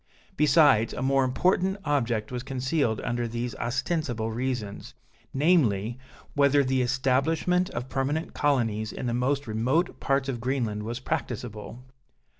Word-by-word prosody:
Besides, 145 -7 +4
a 125 - -4
more 135 0 +3
important 185 +8 +1
object 120 -7 0
was 125 -1 -3
concealed 130 -2 -1
under 120 0 -2
these 120 +1 -3
ostensible 120 -2 -2
reasons, 115 -4 -4 0.4
namely, 130 - +2 0.3
whether 140 0 +4
the 130 0 +1
establishment 135 +8 +1
of 120 -5 -5
permanent 140 +5 -2
colonies 115 -7 0
in - - -6
the 120 - -1
most 135 +4 0
remote 125 +10 0
parts 135 -1 0
of 125 -4 -3
Greenland 120 -5 -1
was 115 +3 -4
practicable. 120 -4 -5
130 Hz, 130 wpm, -27 LUFS, 115-145 Hz, 0.4 s, Besides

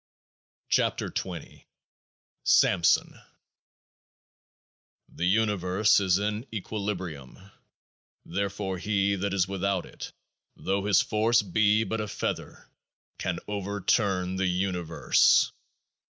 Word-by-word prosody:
28 - - 0
KEOAAH - - -4
K - - -19 0.8
SAMSON 85 -3 +3 1.9
The 90 - -2
Universe 105 -1 +2
is 95 -2 +2
in 105 +4 -3
equilibrium; 95 - -5 0.9
therefore 95 +1 -3
He 100 0 +1
that 100 +1 -2
is 95 -2 +2
without 95 -1 -1
it, - - -9 0.4
though 100 +1 -2
his 100 -1 +4
force 110 +1 +2
be 105 +3 +2
but 110 0 -3
a 105 - -4
feather, - - -5 0.5
can - - -2
overturn 100 -2 0
the 95 0 +1
Universe. 90 -2 +2
100 Hz, 95 wpm, -27 LUFS, 95-105 Hz, 1.9 s, his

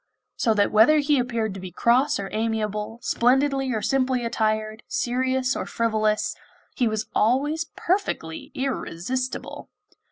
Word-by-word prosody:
So 225 -2 +1
that 205 -1 +2
whether 225 +9 +6
he 295 0 +3
happened 235 -4 -1
to 195 - -7
be 185 0 -7
cross 245 - +2
or 195 - -3
amiable, 215 0 -2
splendidly 270 +2 +2
or 220 -3 -2
simply 255 -2 +1
attired, 215 -1 -1
serious 260 +1 0
or - - -4
frivolous, 215 -2 0 0.4
he 245 - +2
was 220 0 -1
always 285 +8 +1
perfectly 340 - -2
irresistible! 255 -1 -3
235 Hz, 130 wpm, -24 LUFS, 215-260 Hz, 0.4 s, whether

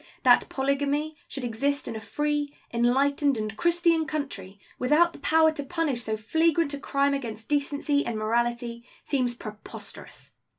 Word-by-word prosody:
That - - +5
polygamy 285 +3 0
should 270 - -6
exist 275 +5 -1
in - - -4
a - - -4
free, 295 +6 -1 0.2
enlightened, 270 +3 +2
and 215 0 -3
Christian 340 -1 +2
country, 215 -11 -5 0.2
without 315 +7 +4
the - - -12
power 320 0 +4
to 295 -2 -5
punish 285 -4 -1
so 220 -2 -2
flagrant 320 +6 +2
a 285 - -4
crime 280 0 +1
against 225 -5 -5
decency 285 0 +1
and 230 - -3
morality, 235 +2 -1 0.2
seems 250 -4 0
preposterous. 215 -2 -10
280 Hz, 145 wpm, -27 LUFS, 235-295 Hz, 0.2 s, That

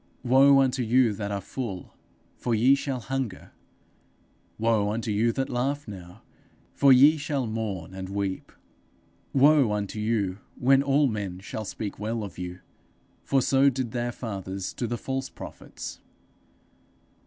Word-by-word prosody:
Woe 135 +2 +6
unto 130 0 +1
you 120 -1 +3
that 100 0 -4
are 100 - -1
full, 100 -4 -6 0.4
for 120 -2 -1
ye 125 +5 +5
shall 140 -2 -2
hunger. 130 -6 -4 1.1
Woe 110 -2 +2
unto 110 +1 -2
you 110 +3 +2
that 135 -1 -1
laugh 135 +3 -2
now, 95 -1 -10 0.5
for 140 -1 +5
ye 140 +5 +7
shall 140 -3 -2
mourn 105 -6 -4
and 95 0 -6
weep. 100 -1 -3 0.8
Woe 140 -3 +5
unto 105 0 -3
you 105 -3 -1 0.2
when 135 +2 +4
all 140 +1 +3
men 105 -7 -2
shall 105 +2 -6
speak 100 +1 -5
well 110 +1 -2
of 100 -3 -8
you; 90 0 -6 0.6
for 135 -2 +2
so 135 +2 +4
did 130 -3 -3
their 120 0 -2
fathers 95 -5 -5
to 120 - -3
the 120 +1 -2
false 135 +2 -3
prophets.' - - -9
115 Hz, 145 wpm, -26 LUFS, 100-135 Hz, 1.1 s, ye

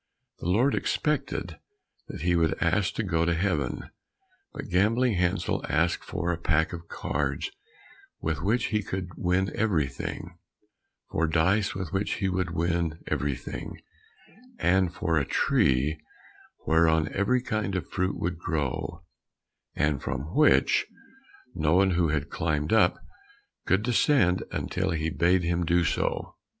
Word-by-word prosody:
The - - -5
Lord 120 +9 +3
expected 150 -2 -1 0.5
that - - -7
he 90 +1 +2
would 85 -1 +2
ask 95 +3 +1
to 110 - -1
go 85 -4 +1
to 85 0 +1
Heaven; 80 -8 -1 0.6
but - - -7
Gambling 110 +7 +3
Hansel 90 +1 0
asked - - +1
for 85 +1 -2
a 85 - -3
pack 80 0 +1
of 85 -1 -7
cards 70 -2 -2 0.7
with 80 -2 -2
which 110 +7 +1
he 105 - +2
could 95 -2 -4
win 90 +2 0
everything, 90 -11 -2 0.7
for 80 +1 +1
dice 90 +5 +2
with 95 -3 -5
which 100 +1 0
he 95 -2 -1
would 90 -1 -1
win 85 -1 -1
everything, 70 -4 -3 0.8
and 95 -1 +2
for 80 -2 0
a - - 0
tree 70 +3 +2 0.7
whereon 80 -1 +3
every 120 +6 +1
kind 110 -5 -2
of 90 -6 -3
fruit 95 +1 -1
would 85 -1 -2
grow, 80 +1 -3 0.7
and 75 -2 +1
from 70 +6 -4
which 155 - +4 0.7
no 80 -2 +1
one 95 +1 +4
who 85 -1 +2
had 75 -1 -2
climbed 75 +1 -1
up, 110 - +4 0.7
could 95 +3 +2
descend 120 -5 +3
until - - -2
he 80 0 -1
bade 85 +1 +2
him 85 +1 0
do 85 +1 +2
so. - - -2
85 Hz, 140 wpm, -27 LUFS, 80-95 Hz, 0.8 s, which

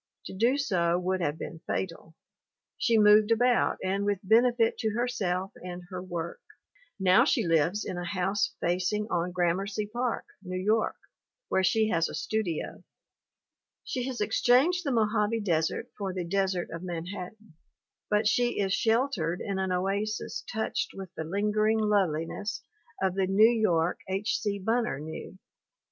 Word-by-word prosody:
To - - -7
do 235 +8 +2
so 175 -11 +1
would 185 +1 -1
have 150 -2 -1
been 160 0 -7
fatal. 165 -3 -4 0.6
She 230 -2 +3
moved 210 0 +6
about 245 +2 +3
and 195 +2 0
with 205 0 +1
benefit 230 +3 +3
to 220 -1 -1
herself 195 -6 -1
and 180 0 -7
her 185 -1 -4
work. 170 -2 -5 0.6
Now 185 -1 +5
she - - +1
lives 165 +5 +2
in 175 - -4
a - - -4
house 190 +3 -1
facing 185 +5 0
on 175 +1 0
Gramercy 185 +4 0
Park, 240 +3 -2 0.2
New 185 -1 -5
York, 215 +4 +1 0.5
where 190 - +2
she 220 +4 +3
has 165 -4 +1
a - - -6
studio. 170 +1 -3 1.0
She 255 -2 -3
has 255 -4 -4
exchanged 255 - +3
the 280 - -1
Mojave 220 -1 +1
desert 165 -5 -1
for 195 -2 -3
the 180 -2 -2
desert 190 -1 -1
of 165 - -6
Manhattan, 180 +3 -7 0.6
but 210 +1 +2
she 240 +1 +1
is 195 -1 +1
shel 230 +6 +3
tered 175 - -2
in 195 -1 -3
an 190 -1 -1
oasis 195 +4 -2
touched 220 0 -2
with 190 -2 -8
the 160 - -4
lingering 210 +5 +1
loveli 190 -7 +1
ness 205 +3 -5 0.4
of 190 -1 +2
the 190 0 0
New 200 +4 +6
York 180 -7 +1
H. 195 +3 0
C. 205 -2 -1
Bunner 225 - 0
knew. 160 +4 -8
195 Hz, 155 wpm, -28 LUFS, 180-220 Hz, 1.0 s, moved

